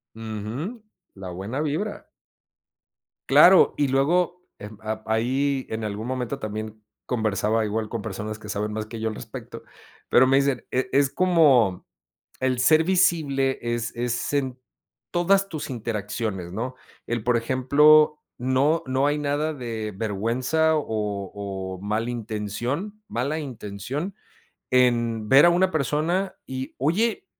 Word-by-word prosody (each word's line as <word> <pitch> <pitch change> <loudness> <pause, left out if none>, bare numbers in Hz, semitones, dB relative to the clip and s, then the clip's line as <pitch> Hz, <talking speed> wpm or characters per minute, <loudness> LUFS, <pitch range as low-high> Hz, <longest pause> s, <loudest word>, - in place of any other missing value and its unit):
Ujú. 115 - -5 0.3
La 95 -1 -7
buena 100 +10 -4
vibra. 155 +8 -3 1.2
Claro 185 +1 +7
y 145 -1 +2
luego 175 +7 +1
em, 105 0 -9
ap 110 0 -5
ahí, 130 +4 0
en 110 0 -4
algún 105 +1 -4
momento 125 -2 -3
también 110 0 -6 0.3
conversaba 110 -1 0
igual 110 +1 -2
con 115 - -4
personas 110 0 -5
que 105 -1 -10
saben 105 +1 -2
más 110 0 -3
que 115 0 -7
yo 110 0 -1
al 110 - -6
respecto - - -9 0.5
pero 130 +1 +6
me 135 +1 +4
dicen: 140 -3 +1
"eh, 130 +1 0
es 140 0 +3
como, 145 - +3 0.5
el 130 -1 +1
ser 155 +6 +5
visible 150 -7 +2
es 120 -1 -2
es 120 +2 -2
en 135 -3 -1 0.5
todas 195 +3 +3
tus 155 -5 -5
interacciones, 105 -5 -4
¿no?," 125 +5 -4 0.3
el 120 -1 -2
por 120 +1 +2
ejemplo 150 +5 +4 0.2
no 130 +6 +2
no 130 +2 +1
hay 145 +1 +1
nada 150 +2 -1
de 115 -5 -5
vergüenza 120 +10 +1
o 150 - -1 0.5
o 95 -2 -5
mala 110 +4 -1
intención 120 - -4
mala 140 +7 -2
intención 130 - -5 0.6
en 120 -3 +2
ver 135 +7 +7
a - - +7
una 185 +2 +3
persona 160 +6 0
y 130 0 -6
oye, 190 - 0
125 Hz, 140 wpm, -24 LUFS, 110-150 Hz, 1.2 s, Claro